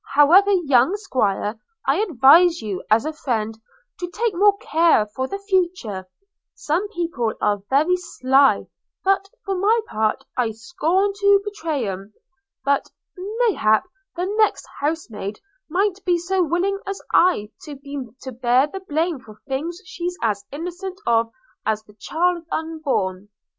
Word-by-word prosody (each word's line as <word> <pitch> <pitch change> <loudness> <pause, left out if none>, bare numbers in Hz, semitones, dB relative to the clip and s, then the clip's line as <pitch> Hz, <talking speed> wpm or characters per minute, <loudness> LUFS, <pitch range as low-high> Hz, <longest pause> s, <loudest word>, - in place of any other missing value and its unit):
However, 345 +8 +6
young 295 -3 +3
'Squire, 220 - -1 0.3
I 285 +9 +2
advises 335 - +5
you, 200 -4 -4
as 220 +5 +4
a 310 - -2
friend, 225 -8 -2 0.4
to 355 - -4
take 450 +3 -1
more 400 +3 +4
care 330 - +3
for 260 +5 -4
the 395 - -4
future: 355 - -1 0.5
some 350 +7 -1
people 330 - -2
are 205 -1 +1
very 310 +7 +3
sly; 270 -5 +2 0.4
but 390 +1 +1 0.2
for 395 - -1
my 410 +5 +3
part 220 - -1
I 235 -3 0
scorn 350 - 0
to 400 0 +4
betray 320 - -3
'um 195 +2 -6 0.3
– 400 - -50
but 280 0 +1 0.3
mayhap 395 - +1 0.3
the 355 +1 -1
next 420 +1 +1
housemaid 240 -9 -3 0.3
mid'nt 385 +3 0
be 355 -2 +2
so 370 +2 0
willing 355 +5 0
as 395 0 -3
I 225 - +3 0.2
have 280 -2 -9
been 275 -5 -7
to 260 - -6
bear 250 +2 +3
the 345 +6 -7
blame 330 -3 -1
for 215 -3 -15
things 320 +7 -3
she's 355 -1 -4
as 205 -3 0
innocent 360 +5 -6
of 230 -1 +2 0.3
as 215 -1 -1
the 210 - -19
child 340 - -1
unborn.' 265 - -2
320 Hz, 150 wpm, -22 LUFS, 235-375 Hz, 0.5 s, However